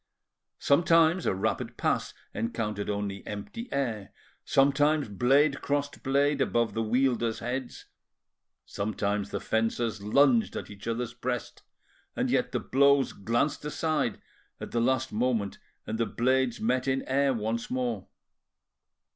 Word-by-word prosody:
Sometimes 165 +3 +4
a - - +1
rapid 110 +4 -2
pass - - -1 0.2
encountered 105 -2 -3
only 100 -1 -3
empty 170 - -6
air; 115 -8 -2 0.3
sometimes 145 +2 +3
blade 135 +7 +3
crossed 145 0 -2
blade 140 +2 +2
above 115 -3 +1
the 115 - -1
wielders' 120 0 +1
heads; 125 +2 -5 0.8
sometimes 100 0 -2
the - - -3
fencers 110 -1 -1
lunged 120 +2 +3
at - - -6
each 100 +1 -10
other's 120 +1 -2
breast, 125 0 -4 0.5
and - - 0
yet - - +1
the - - 0
blows 140 0 +3
glanced 120 +10 -1
aside 150 -5 -1 0.4
at - - -7
the 120 - +1
last 130 +1 +1
moment 110 -3 0 0.3
and 110 +1 -4
the 115 - +1
blades 130 +2 +1
met 125 +3 0
in 135 0 +1
air 140 +1 +2
once 115 -1 -2
more. 120 -6 -2
120 Hz, 130 wpm, -28 LUFS, 110-140 Hz, 0.8 s, Sometimes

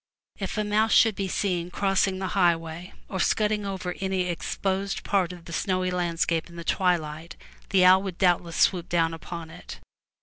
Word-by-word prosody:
If 195 0 -4
a 215 - +1
mouse 215 +1 +2
should 225 -1 +6
be 195 0 -3
seen 180 -2 -1
crossing 195 +1 +1
the 190 - -3
Ifl^^^l^ - - -2
highway, 170 -2 0
or 190 - -4
scudding 210 +2 +1
over 185 -2 -4
any 190 -1 -1
exposed 190 +2 -2
part 190 -3 +1
of 180 -1 -10
rfn^^mM - - -22
the 170 - -9
snowy 185 0 0
surface 170 -2 -1
in 170 - -13
the 170 - -7
twilight, 165 -3 -1 0.3
the 190 -2 +4
owl 185 +1 +7
would 190 -3 -5
'Mf^/M - - -16
doubtless 175 -2 +2
swoop 175 -3 +2
down 165 -1 +2
uponit. 165 0 -8
180 Hz, 190 wpm, -26 LUFS, 170-195 Hz, 0.3 s, owl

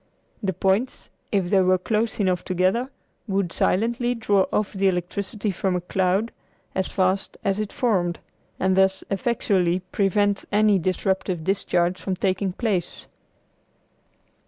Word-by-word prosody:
The 195 -3 -1
points 195 +8 -1 0.2
if 190 -4 0
they 195 -2 +5
were 185 0 +4
close 220 +5 -1
enough 185 -3 +1
together 185 +8 +1 0.4
would 195 -4 -1
silently 235 +5 +1
draw 205 -4 +2
off 210 -1 0
the 195 0 +1
electricity 195 +3 -2
from 185 0 -1
a 180 - -1
cloud 190 +5 0 0.4
as 190 -1 -1
fast 190 0 0
as 195 +1 0
it 215 -1 -3
formed, 180 -8 0 0.4
and 190 0 +2
thus 190 0 +3
effectually 195 -5 +1
prevent 200 0 +1
any 210 -1 +4
disruptive 185 -1 -1
discharge 185 -1 0
from 190 - -2
taking 190 +1 0
place. 190 -3 -2
190 Hz, 135 wpm, -24 LUFS, 185-205 Hz, 0.4 s, they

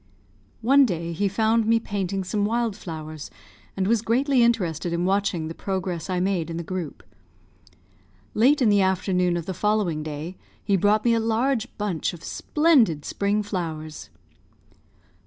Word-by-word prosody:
One 275 +4 +6
day 170 -7 -2
he 200 +5 0
found 220 +2 +1
me 230 0 +4
painting 195 -3 -3
some 205 +3 -1
wild 230 0 0
flowers, 155 -4 -7 0.5
and 190 - +1
was 225 +2 +2
greatly 255 +3 +2
interested 180 -8 +1
in 170 +1 0
watching 190 -4 0
the 165 - -5
progress 185 -2 -4
I 180 -1 0
made 180 -3 0
in 165 - -4
the 170 - -4
group. 175 -3 -5 1.3
Late 265 +5 +4
in 225 - +4
the 205 -1 +4
afternoon 180 -2 +1
of 170 - -4
the 190 - -3
following 205 -6 0
day 155 +4 -6 0.3
he 200 - +2
brought 205 +4 +2
me 235 - +4
a 230 - +2
large 230 +2 0
bunch 200 -7 -2
of 170 - -11
splendid 260 - +2
spring 205 +1 0
flowers. 160 -6 -5
195 Hz, 155 wpm, -24 LUFS, 170-220 Hz, 1.3 s, One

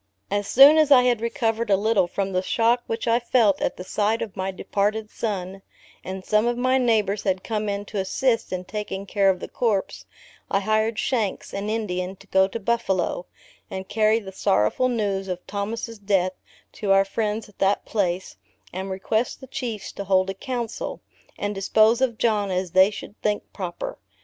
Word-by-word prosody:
As 205 0 0
soon 285 +5 +8
as 305 -2 +4
I 260 -3 +7
had 245 -3 +2
recovered 230 -1 -1
a 195 - +5
little 215 -2 +2
from 195 +2 -2
the 185 -1 +1
shock 230 +5 +2
which 225 +1 -3
I 230 +1 +4
felt 235 -5 +2
at - - -1
the 180 - -6
sight 210 +4 0
of 205 - -8
my 190 -1 -2
departed 210 +3 -1
son, 195 -3 -4 0.4
and 185 0 -6
some 215 +2 +2
of 240 0 0
my 255 +1 +2
neighbors 215 -5 +2
had 190 -1 -1
come 215 -2 -2
in 200 0 -3
to 205 - -4
assist 230 +5 0
in 185 0 -3
taking 205 -1 -5
care 200 0 +2
of 185 -1 +1
the - - -6
corpse, 215 -5 -1 0.4
I 195 - +1
hired 215 +2 +1
Shanks, 220 -7 -1
an 200 +1 -3
Indian, 190 -4 -2
to 195 - -18
go 190 -1 +3
to 230 - -5
Buffalo, 195 -6 -1 0.4
and 190 0 -6
carry 215 0 +3
the 200 -4 -6
sorrowful 190 - +1
news 200 -5 -1
of 180 -1 -5
Thomas' 220 +2 -4
death, 195 -2 +1 0.4
to 200 -2 -2
our 195 0 +5
friends 215 +2 -2
at 210 - -21
that 195 +1 +2
place, 185 -3 -2 0.4
and 190 +2 -4
request 215 +5 -1
the 265 - -10
Chiefs 235 -5 -5
to 200 - -6
hold 190 0 +2
a - - -6
Council, 240 +3 -4 0.4
and 205 0 -2
dispose 215 +4 +3
of 245 -4 +1
John 210 -4 +1
as 185 -1 -2
they 190 +2 +6
should 210 0 -10
think 210 -1 0
proper. 195 - -5
205 Hz, 190 wpm, -24 LUFS, 190-230 Hz, 0.4 s, soon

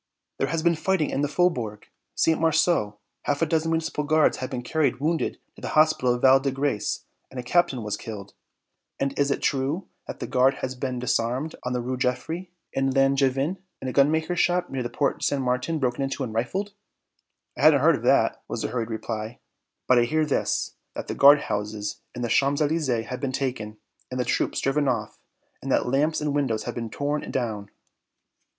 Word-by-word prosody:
"There - - +1
has 165 -1 -2
been 170 0 +4
fighting 165 -1 0
in 140 - -1
the 145 - +1
Faubourg 135 -11 0 0.3
St. 160 -1 +2
Marceau; 160 -10 +2 0.3
half 145 +2 +1
a - - +4
dozen 160 0 0
Municipal 160 -2 -1
Guards 155 +1 +3
have 130 - -4
been 125 -2 -4
carried 145 -1 0
wounded 160 +3 0 0.2
to - - -15
the - - -4
hospital 155 -6 +4
of 120 - -7
Val 135 0 +7
de 135 +1 -1
Grace 135 -5 -2 0.2
and 130 - -7
a - - -4
captain 130 -3 +1
was 105 -1 -2
killed." 105 -3 -8 0.7
"And 135 0 0
is 140 0 +3
it 140 - -1
true 140 +6 0 0.2
that - - -7
the - - -3
Guard 130 +2 +3
has 130 0 -4
been 130 0 -3
disarmed 125 +5 -1
on 125 - -2
the 125 - -1
Rues 125 +1 -3
Geoffroi 160 +9 -2 0.3
and 135 0 +1
Langevin, 135 +4 +2 0.2
and 130 - -5
a 130 - -3
gunmaker's 160 +5 +2
shop 180 0 +1
near 135 -1 -2
the 120 - -3
Porte 140 - -1
St. 140 - +1
Martin 125 +5 0
broken 130 -2 -1
into 135 0 -2
and 115 -4 -5
rifled?" 190 - -2 0.8
"I - - -6
hadn't - - +6
heard - - +5
of - - -9
that," - - +3
was - - -4
the - - -1
hurried 115 -2 -2
reply. 110 0 -4 0.5
"But 125 -1 +5
I 120 - +3
hear 155 +5 +1
this, 150 - -1 0.2
that - - -6
the - - -1
guard 140 +1 +7
houses 105 0 -3
in 120 - -4
the - - 0
Champs 140 +4 +2
Elysées 145 -7 0
have 125 - -5
been 135 -2 -1
taken, 125 -6 -3 0.3
and 130 - -4
the 125 - 0
troops - - 0
driven 140 +1 +1
off, 115 -4 -2 0.4
and - - -4
that - - +2
lamps 145 +6 +1
and 150 -1 -1
windows 130 -7 0
have - - -4
been 115 -1 -4
torn 145 +5 -2
down." 110 -6 -3
135 Hz, 205 wpm, -25 LUFS, 125-155 Hz, 0.8 s, Val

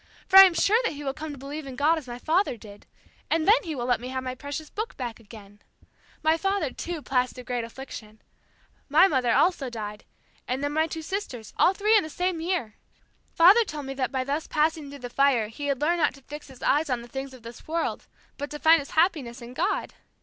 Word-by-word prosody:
For 385 - +9
I 385 - +12
am 360 -3 +2
sure 440 +7 +3
that 465 - -1
he 290 0 -8
will 270 -1 -2
come 305 +1 -6
to 285 - -8
believe 280 +2 -7
in 260 - -7
God 310 +4 +2
as 280 - -14
my 240 0 -6
father 320 0 +1
did, 205 -2 -14 0.4
and 325 +1 +1
then 435 +4 +6
he 320 -3 -4
will 240 -2 -3
let 245 -2 +1
me 250 - -6
have 260 0 -4
my 255 -1 -3
precious 285 +4 -6
Book 435 +2 -5
back 240 -4 -5
again. 205 -2 -14 0.6
My 315 +1 +3
father, 390 -5 -1
too, 335 0 -6
passed 250 -1 0
through 250 - -9
great 245 -1 -3
affliction. 230 -3 -9 0.7
My 315 +7 +6
mother 255 -8 +1
also 310 0 +2
died, 210 -3 -7 0.4
and 260 +3 -2
then 290 0 -1
my 315 +1 +2
two 320 0 -6
sisters, 310 - -5
all 375 - +4
three 425 +3 +3
in 425 - +6
the 315 - -7
same 355 +1 -2
year. 330 - -2 0.6
Father 380 +8 +7
told 300 -8 -7
me 270 - -5
that 265 -2 -2
by 260 -2 -1
thus 285 +4 -3
passing 310 -1 0
through 285 - -9
the 250 -2 -7
fire 260 -6 +2
he 285 +6 -6
had 275 -2 0
learned 340 +4 +1
not 300 - +2
to 275 - -18
fix 295 +3 -9
his 265 -3 -13
eyes 300 +1 +2
on 245 -2 -1
the - - -11
things 270 +2 -6
of 255 -3 -14
this 230 0 -11
world, 330 +1 -2 0.3
but 285 +1 -4
to 300 - -6
find 320 +2 +5
his 280 - -8
happiness 300 -8 +1
in 240 0 -10
God. - - -1
285 Hz, 240 wpm, -26 LUFS, 250-325 Hz, 0.7 s, I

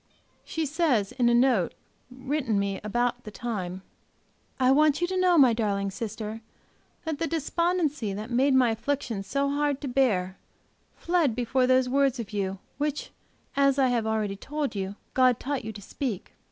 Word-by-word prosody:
She 320 -1 -3
says, 285 - +1
in 245 -2 +2
a - - +3
note 240 -7 +3 0.3
written 260 -3 -2
me 200 -1 -1
about 240 +3 -1
the - - -7
time: 195 -5 -5 0.8
"I 255 0 +4
want 300 +1 +4
you 350 - +2
to 375 +2 -3
know, 365 -2 +4
my 260 -5 +6
darling 200 -3 -1
sister, 220 0 -5 0.6
that 315 -2 -3
the 330 - 0
despondency 325 - 0
that 210 +4 -6
made 260 +3 +3
my 250 -3 +4
affliction 230 -2 -2
so 275 +8 -1
hard 290 -1 0
to 285 - -4
bear 205 -8 +1 0.6
fled 335 -9 +1
before 250 +1 +1
those 255 0 +4
words 275 -1 +2
of 220 -2 -6
yours 195 -1 -2 0.2
which, 295 0 -2 0.4
as 275 -1 +3
I 265 -2 +4
have 235 -3 0
already 215 -2 -1
told 290 +7 -3
you, 195 -1 -4 0.2
God 255 -2 +4
taught 280 -1 -3
you 220 - -5
to 210 -1 -10
speak. 225 -3 -4
250 Hz, 170 wpm, -27 LUFS, 215-285 Hz, 0.8 s, my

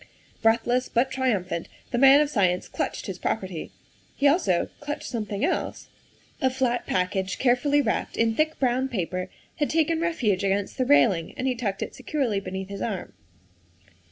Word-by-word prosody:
Breathless, 235 +3 +2
but 255 +3 +1
triumphant, 200 -10 -1 0.2
the 240 - 0
man 275 +2 +8
of 300 - +1
science 185 -6 +1
clutched - - -3
his 185 -2 -6
property. 190 -6 -3 0.5
He 285 - +3
also 280 - +2
clutched 290 0 -5
something 215 0 -2
else. 365 - -2 0.5
A 260 - +4
flat 255 -2 -1
package 185 +1 -1
carefully 275 +3 +3
wrapped - - -2
in 225 0 +2
thick 310 +5 0
brown 260 0 +1
paper 185 -4 -3 0.3
had 295 - 0
taken 325 0 +1
refuge 235 - 0
against 195 +4 -1
the 255 - +2
railing, 200 - +3
and 255 - -2
he 260 - +2
tucked 210 -5 -2
it - - -7
securely 260 -5 -1
beneath 190 0 -6
his 200 -1 -6
arm. 205 -5 -4
235 Hz, 160 wpm, -25 LUFS, 195-270 Hz, 0.5 s, man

